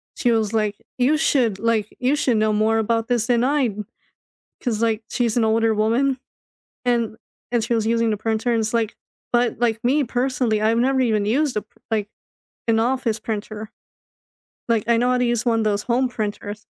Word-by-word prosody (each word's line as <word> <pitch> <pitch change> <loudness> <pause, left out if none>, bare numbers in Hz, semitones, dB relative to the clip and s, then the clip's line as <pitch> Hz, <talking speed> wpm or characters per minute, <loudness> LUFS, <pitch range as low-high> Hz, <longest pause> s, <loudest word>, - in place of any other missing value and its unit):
she 240 - +1
was 220 -2 +1
like, 210 -2 0 0.2
"You 265 +5 +3
should 245 -10 +2
like, 220 -1 0
you 260 +3 +2
should 250 -5 +1
know 215 0 +2
more 215 +1 +2
about 225 +1 0
this 240 -2 0
than 240 -1 +2
I" 275 -1 +2 0.9
'cause, 230 -4 -1
like, 225 -1 +1
she's 240 -2 0
an 235 - +3
older 225 0 +2
woman 245 +5 +1 0.7
and 235 -3 0 0.3
and 240 -2 +1
she 235 - -1
was 220 -1 0
using 230 0 +2
the 210 - -1
printer 225 +3 -1
and 225 - +1
it's 215 +1 -2
like 230 -2 0 0.4
but, 240 0 +2
like, 230 -1 0
me 275 +4 +3
personally, 245 -3 0
I've 220 +1 +2
never 260 +2 +2
even 215 -4 +1
used 265 +4 +1
a - - 0
p - - -44 0.2
like, 210 -2 0 0.6
an 225 -1 +3
office 235 -1 0
printer. 215 0 -5 1.0
Like, 230 -3 +2
I 235 - +4
know 245 +1 +2
how 250 - +2
to 250 - +2
use 235 -2 0
one 230 -1 +2
of - - 0
those 205 -1 0
home 250 +2 +1
printers 210 -2 -5
230 Hz, 195 wpm, -22 LUFS, 215-245 Hz, 1.0 s, I